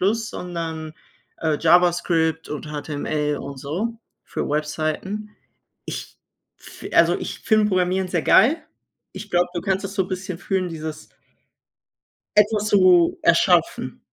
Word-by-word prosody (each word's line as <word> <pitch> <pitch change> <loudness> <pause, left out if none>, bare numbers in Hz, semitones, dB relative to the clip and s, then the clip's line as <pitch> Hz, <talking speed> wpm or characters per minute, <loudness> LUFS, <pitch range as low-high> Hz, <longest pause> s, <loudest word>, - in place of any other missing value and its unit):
sondern, 165 -7 -5 0.5
äh, 155 -2 0
JavaScript 165 -1 +2
und 150 0 -5
HTML 150 0 -2
und 140 0 -7
so, 210 - -3 0.2
für - - -4
Webseiten. 155 +8 -2 0.6
Ich - - -7 0.4
f - - -13
also - - +5
ich - - -6
finde 215 -3 +3
Programmieren 185 0 +1
sehr 175 - 0
geil. 295 +9 +5 0.5
Ich 205 +2 -8
glaube, 175 0 +3
du 175 - -1
kannst 195 0 -1
das 195 +1 -7
so 190 - +2
'n - - -10
bisschen 185 -1 -4
fühlen, 190 -2 -1
dieses 155 -1 -7 1.3
etwas 210 0 +3
zu 185 - +5
erschaffen. - - +2
175 Hz, 125 wpm, -22 LUFS, 155-195 Hz, 1.3 s, also